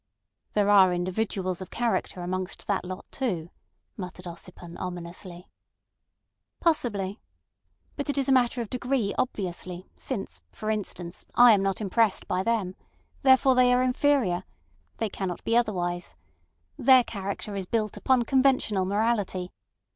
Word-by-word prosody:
"There 205 -1 +2
are 190 -3 +6
individuals 185 0 -2
of 185 - -7
character 230 -6 -1
amongst 185 +1 -4
that 200 -2 0
lot 185 +1 -7
too," 180 -11 -2 0.5
muttered 180 -1 -7
Ossipon 175 0 -9
ominously. 175 0 -6 1.1
"Possibly. 210 - 0 0.8
But 285 0 -4
it 285 - -1
is 275 - +1
a - - +3
matter 245 -2 +3
of 215 - -12
degree 250 -4 0
obviously, 185 -5 -3
since, 195 - -5
for 215 - -3
instance, 185 -4 -4
I 245 0 +8
am 205 -3 +4
not 195 +1 -1
impressed 215 +1 +1
by 185 - 0
them. 200 -4 -1 0.5
Therefore 265 0 +6
they 250 0 +5
are 250 0 +4
inferior. 250 -8 +2 0.5
They 225 - 0
cannot 190 -3 -4
be 230 - +1
otherwise. 175 -7 0 0.6
Their 260 0 +7
character 200 -1 -5
is 195 -2 -4
built 215 -1 -1
upon 245 +4 +2
conventional 255 -7 +2
morality. 200 -3 0
200 Hz, 135 wpm, -27 LUFS, 185-240 Hz, 1.1 s, I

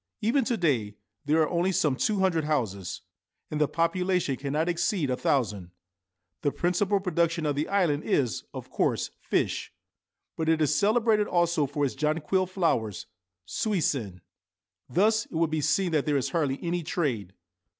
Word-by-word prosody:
Even 235 +6 +2
to 240 -2 0
day 120 - 0 0.3
there 155 +2 +3
are - - -1
only 175 +2 +1
some 150 -6 +2
two 200 +8 0
hundred 170 -5 +2
houses, 110 - -2 0.5
and 150 0 -1
the 150 - +4
population 180 -2 0
cannot 145 +5 -1
exceed 175 - 0
a - - +1
thousand. 105 -10 0 0.7
The 145 - +1
principal 185 +5 +1
production 170 -3 0
of 145 -1 0
the 150 +2 -1
island 170 -7 +1
is, 125 -6 0
of - - -9
course, - - 0
fish; - - -1 0.6
but 160 0 -1
it 160 -1 +3
is 150 -1 +2
celebrated 215 +2 +3
also 170 -4 +2
for 145 +1 -1
its 135 - -2
jonquil 155 +6 0
flowers 165 - -1 0.4
(suisenn). 135 - -1 0.7
Thus 215 +5 +2
it - - -17
will 165 +1 +2
be 155 -1 -1
seen 185 +4 +1
that 155 -2 +1
there 145 -1 +2
is 130 - -1
hardly 145 -6 0
any 175 0 -1
trade. 130 - -2
160 Hz, 160 wpm, -27 LUFS, 140-180 Hz, 0.7 s, the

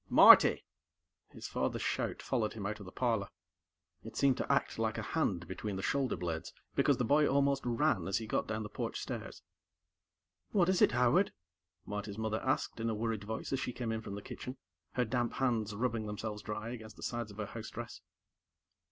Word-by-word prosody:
"Marty!" - - +8 0.6
His - - -8
father's - - -1
shout - - -1
followed 110 -5 0
him 105 -3 -6
out 105 +1 -3
of 100 - -9
the - - -8
parlor. 115 -5 0 0.8
It - - -9
seemed 135 -2 +4
to - - -1
act 140 -4 +1
like 110 -1 0
a - - -2
hand 95 - -1
between 95 +2 -4
the 95 - -4
shoulder 135 -3 +1
blades, 85 -1 -3 0.2
because - - +3
the 125 - +1
boy 145 +4 +4
almost 140 0 +2
ran 120 - +1
as 95 - +1
he 115 - -4
got 110 - -1
down 110 0 -2
the - - -5
porch - - -3
stairs. - - -6 1.1
"What 185 -4 +4
is 185 - +2
it, - - +6
Howard?" 125 +11 +3 0.5
Marty's 105 0 -5
mother 110 0 -1
asked 130 -3 0
in 115 0 0
a 110 - -1
worried 110 -1 -2
voice 110 +5 -4
as 135 - +1
she 125 - -3
came 120 -2 -3
in 110 0 -2
from 100 - -6
the 100 - -7
kitchen, 125 +2 -7 0.4
her 125 - +1
damp 120 +1 0
hands 115 -5 0
rubbing 115 -1 -1
themselves 105 0 -4
dry 110 +1 -4
against 110 -3 -8
the - - -11
sides 120 -2 -3
of 100 - -12
her 105 - -2
housedress. 110 +2 -7
110 Hz, 200 wpm, -33 LUFS, 105-125 Hz, 1.1 s, Marty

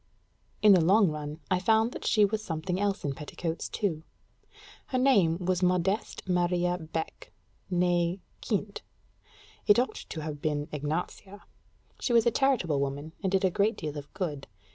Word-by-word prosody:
In 210 -1 +8
the 180 -3 +5
long 195 +1 +5
run, 150 +1 -6
I 185 - +3
found 220 +4 +3
that - - -6
she 210 -2 +5
was 215 +1 -2
something 180 0 -3
else 205 0 0
in 140 - -1
petticoats 160 +3 -5
too. 170 -7 -2 0.9
Her 255 - -1
name 205 -11 +4
was 180 0 -1
Modeste 180 +3 0
Maria 180 0 +1
Beck, 160 0 -6 0.4
née 175 0 +1 0.2
Kint: 205 -2 -2 0.9
it 205 - +7
ought 250 +2 +1 0.2
to 160 - -5
have 150 -2 -5
been 150 -1 -1
Ignacia. 160 +7 -4 0.6
She 245 - -1
was 230 -2 +5
a 235 - +4
charitable 225 - +2
woman, 140 +3 -3
and 190 -2 -1
did 195 0 +2
a 185 - +2
great 205 +5 +1
deal 150 -2 -5
of 145 -1 -8
good. 150 -8 -3
180 Hz, 165 wpm, -28 LUFS, 160-205 Hz, 0.9 s, In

